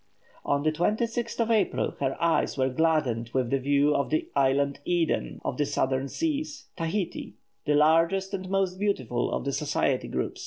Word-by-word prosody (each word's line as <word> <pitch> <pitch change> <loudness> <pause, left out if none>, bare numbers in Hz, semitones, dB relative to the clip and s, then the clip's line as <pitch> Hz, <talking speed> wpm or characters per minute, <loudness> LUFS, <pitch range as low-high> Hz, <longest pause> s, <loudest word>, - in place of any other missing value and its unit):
On 140 0 0
the 155 - +2
26th 230 +8 -1
of 230 0 +1
April, 215 -3 +1
her 135 -1 -1
eyes 170 -3 +1
were 130 0 +2
gladdened 130 -6 +1
with 130 -1 0
a 135 - +3
view 140 +2 +3
of 140 - 0
the 155 - -1
"island 140 +1 +2
Eden" 170 -1 0
of - - -2
the 145 - +1
Southern 130 0 0
seas, 310 - -3
Tahiti, 165 - -3 0.3
the 150 - +3
largest 165 +6 +3
and 185 -1 -4
most 190 -1 0
beautiful 130 - 0
of - - -2
the 140 - -1
Society 140 -3 0
group. - - -3
155 Hz, 170 wpm, -27 LUFS, 140-190 Hz, 0.3 s, a